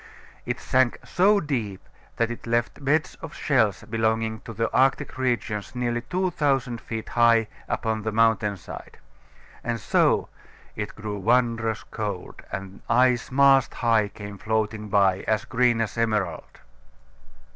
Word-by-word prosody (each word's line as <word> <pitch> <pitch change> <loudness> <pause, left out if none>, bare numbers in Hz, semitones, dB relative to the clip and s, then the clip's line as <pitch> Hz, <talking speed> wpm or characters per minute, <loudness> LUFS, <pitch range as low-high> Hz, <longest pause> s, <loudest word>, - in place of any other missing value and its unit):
It - - -2
sank 130 -2 +2
so 200 +3 +4
deep 120 - -3 0.3
that 115 0 +1
it 120 - -8
left 120 +4 -1
beds 155 +3 +1
of 160 -2 -8
shells 115 -8 +1
belonging 110 0 -1
to - - -6
the 115 +1 -2
Arctic 135 +1 +2
regions 120 -5 -2
nearly 120 -1 -1
two 185 +9 -1
thousand 135 -7 0
feet 110 -1 -6
high 115 -2 +4 0.2
upon 110 -1 -1
the 110 +1 -2
mountain 110 -2 +2
side. - - -10 0.7
And 120 0 -2
so - - +2 0.5
"It 105 -1 -5
grew 105 -1 -5
wondrous 115 0 +1
cold, 105 -5 -5
And 95 +1 -7
ice 125 0 +3
mast 135 0 +4
high 115 -3 +2
came 100 0 -9
floating 110 -1 -1
by, 95 -2 +3
As 110 +1 +1
green 125 -2 +2
as 110 - -2
emerald." 110 -9 -2
115 Hz, 140 wpm, -25 LUFS, 110-125 Hz, 0.7 s, so